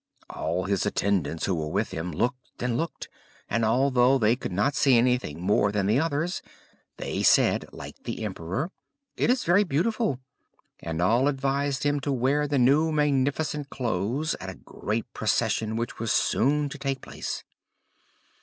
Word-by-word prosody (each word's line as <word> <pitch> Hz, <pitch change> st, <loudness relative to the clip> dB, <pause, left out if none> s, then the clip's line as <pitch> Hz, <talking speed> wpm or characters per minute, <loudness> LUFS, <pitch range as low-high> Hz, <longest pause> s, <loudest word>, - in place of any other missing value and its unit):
All 85 Hz, +3 st, -2 dB
his 100 Hz, +1 st, 0 dB
attendants, 95 Hz, -6 st, 0 dB
who 95 Hz, -, 0 dB
were 80 Hz, -3 st, -2 dB
with -, -, -1 dB
him, 85 Hz, +2 st, -4 dB
looked 125 Hz, -, -3 dB
and 125 Hz, -2 st, 0 dB
looked, 165 Hz, +6 st, -3 dB, 0.4 s
and 115 Hz, +1 st, 0 dB
although 125 Hz, +3 st, +4 dB
they 115 Hz, -1 st, +3 dB
could 125 Hz, -, -6 dB
not 105 Hz, +11 st, +1 dB
see 135 Hz, -2 st, +4 dB
anything 125 Hz, -10 st, +1 dB
more 100 Hz, +2 st, +2 dB
than 105 Hz, -2 st, 0 dB
the 110 Hz, +6 st, +3 dB
others, 165 Hz, +3 st, -1 dB, 0.6 s
they -, -, -3 dB
said, -, -, +4 dB
like -, -, -10 dB
the -, -, -4 dB
emperor, 95 Hz, -, -3 dB, 0.4 s
"It -, -, +1 dB
is 250 Hz, 0 st, +2 dB
very 180 Hz, +5 st, +4 dB
beautiful." 200 Hz, -, 0 dB, 0.6 s
And 80 Hz, +1 st, -3 dB
all 120 Hz, +8 st, +3 dB
advised 140 Hz, 0 st, 0 dB
him 145 Hz, 0 st, +1 dB
to 140 Hz, +1 st, -2 dB
wear 135 Hz, +3 st, +1 dB
the 145 Hz, -1 st, 0 dB
new 140 Hz, +6 st, +4 dB
magnificent 145 Hz, 0 st, 0 dB
clothes 120 Hz, -, -1 dB
at 95 Hz, -2 st, -6 dB
a 95 Hz, -, -7 dB
great 110 Hz, +2 st, -4 dB
procession 110 Hz, 0 st, 0 dB
which 115 Hz, +1 st, -3 dB
was 115 Hz, -1 st, -1 dB
soon 145 Hz, +2 st, +2 dB
to -, -, -8 dB
take 135 Hz, -2 st, -2 dB
place. -, -, -5 dB
125 Hz, 165 wpm, -26 LUFS, 105-145 Hz, 0.6 s, although